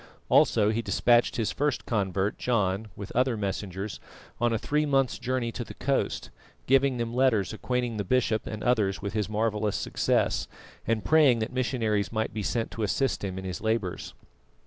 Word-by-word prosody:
Also 105 Hz, -1 st, +4 dB
he 115 Hz, +1 st, -1 dB
despatched 120 Hz, +3 st, +3 dB
his 110 Hz, -3 st, 0 dB
first 145 Hz, -2 st, -1 dB
convert 100 Hz, -2 st, -1 dB
John, 105 Hz, -3 st, 0 dB
with 100 Hz, 0 st, -7 dB
other 125 Hz, -1 st, +1 dB
messengers, 100 Hz, 0 st, -4 dB, 0.4 s
on 120 Hz, 0 st, +2 dB
a 115 Hz, -, +1 dB
three 150 Hz, +7 st, 0 dB
months' 135 Hz, -3 st, +1 dB
journey 125 Hz, -2 st, -1 dB
to 120 Hz, -, -4 dB
the -, -, -11 dB
coast, 135 Hz, 0 st, -1 dB, 0.3 s
giving 135 Hz, 0 st, +3 dB
them 115 Hz, 0 st, -3 dB
letters 120 Hz, -7 st, +2 dB
acquainting 120 Hz, 0 st, -2 dB
the 105 Hz, -, -1 dB
bishop 115 Hz, +1 st, +1 dB
and 110 Hz, -1 st, -5 dB
others 105 Hz, -6 st, +1 dB
with 100 Hz, -, -3 dB
his 105 Hz, -2 st, -1 dB
marvellous 105 Hz, -1 st, 0 dB
success, -, -, 0 dB, 0.4 s
and 115 Hz, -1 st, 0 dB
praying 150 Hz, -6 st, +5 dB
that 110 Hz, +1 st, -3 dB
missionaries 115 Hz, -5 st, 0 dB
might 110 Hz, 0 st, -2 dB
be 110 Hz, -, -3 dB
sent 115 Hz, +3 st, -1 dB
to 115 Hz, -, -6 dB
assist 110 Hz, +2 st, 0 dB
him 95 Hz, -2 st, -3 dB
in 95 Hz, -, -6 dB
his 90 Hz, -1 st, -5 dB
labours. 110 Hz, -5 st, -2 dB
110 Hz, 175 wpm, -27 LUFS, 105-125 Hz, 0.4 s, praying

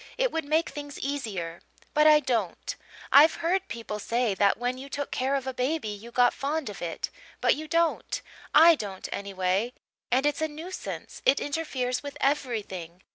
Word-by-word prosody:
It -, -, +2 dB
would 325 Hz, -2 st, -2 dB
make 315 Hz, +3 st, +2 dB
things 290 Hz, 0 st, -7 dB
easier. 205 Hz, -12 st, -4 dB, 0.3 s
But 300 Hz, +1 st, +5 dB
I 305 Hz, -1 st, +7 dB
don't. 230 Hz, -, -1 dB, 0.4 s
I've 300 Hz, +3 st, +8 dB
heard 375 Hz, +3 st, 0 dB
people 225 Hz, -, -5 dB
say 235 Hz, 0 st, 0 dB
that 200 Hz, +1 st, +3 dB
when 245 Hz, +2 st, -2 dB
you 275 Hz, +1 st, -8 dB
took 285 Hz, +1 st, -4 dB
care 265 Hz, +2 st, 0 dB
of 270 Hz, -2 st, -2 dB
a 265 Hz, -, -3 dB
baby 255 Hz, -1 st, -1 dB
you 210 Hz, +3 st, -7 dB
got 245 Hz, 0 st, +4 dB
fond 285 Hz, -1 st, -2 dB
of 200 Hz, -, -10 dB
it 170 Hz, -2 st, -3 dB, 0.3 s
but -, -, +4 dB
you 310 Hz, +2 st, -6 dB
don't 335 Hz, +1 st, +1 dB, 0.3 s
I 330 Hz, +2 st, +8 dB
don't, 200 Hz, -10 st, -5 dB
anyway. 195 Hz, +3 st, -1 dB, 0.4 s
And 260 Hz, +3 st, +2 dB
it's 295 Hz, +1 st, +1 dB
a 315 Hz, -, +2 dB
nuisance 320 Hz, +5 st, -7 dB
it 275 Hz, -, +4 dB
interferes 275 Hz, -5 st, -2 dB
with 285 Hz, -1 st, -7 dB
everything. 210 Hz, -, -2 dB
265 Hz, 180 wpm, -27 LUFS, 215-300 Hz, 0.4 s, I've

